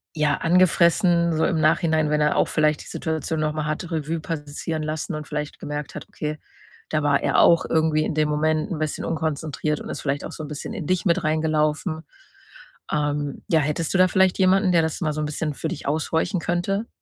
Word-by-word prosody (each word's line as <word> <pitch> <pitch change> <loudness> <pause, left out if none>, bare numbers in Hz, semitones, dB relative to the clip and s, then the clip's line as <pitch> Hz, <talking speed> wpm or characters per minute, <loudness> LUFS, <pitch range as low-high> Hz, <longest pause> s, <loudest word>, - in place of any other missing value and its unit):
ja, 150 -2 +2
angefressen 170 0 +3
so 160 - +2
im 165 - +1
Nachhinein, 155 0 +2
wenn 150 0 +1
er 150 - +2
auch - - +3
vielleicht 155 -1 +1
die - - -15
Situation 160 0 -3
noch 155 0 +1
mal 155 -1 -3
hat 155 +3 -3
Revue 160 0 -2
passieren 155 0 -4
lassen 155 +3 -3
und 150 -1 -6
vielleicht 150 -1 -5
gemerkt 145 0 -5
hat: - - -7
„Okay, 150 0 -4 0.5
da 155 -1 0
war 140 -1 +2
er - - +2
auch 170 -1 +5
irgendwie 160 -1 +2
in - - -2
dem 155 0 +1
Moment 155 +5 0
'n 165 - -3
bisschen 155 -1 -2
unkonzentriert 155 -1 -2
und - - -8
ist - - -5
vielleicht 140 0 -2
auch - - -7
so 155 - -7
'n - - -6
bisschen 150 -1 -6
in 150 - -5
dich 185 -1 0
mit 170 -3 +2
reingelaufen.“ 155 +1 0 0.9
Ähm, 145 -1 -2
ja, 165 -4 +4
hättest 150 +2 -1
du - - +3
da 185 0 +6
vielleicht 190 0 +3
jemanden, 190 +1 +4
der 170 -2 +4
das 160 -1 -2
mal 155 -3 0
so 155 - -3
'n - - -1
bisschen 150 0 -3
für - - -4
dich - - -6
aushorchen 160 +5 0
könnte? 175 +7 -1
155 Hz, 215 wpm, -23 LUFS, 150-165 Hz, 0.9 s, da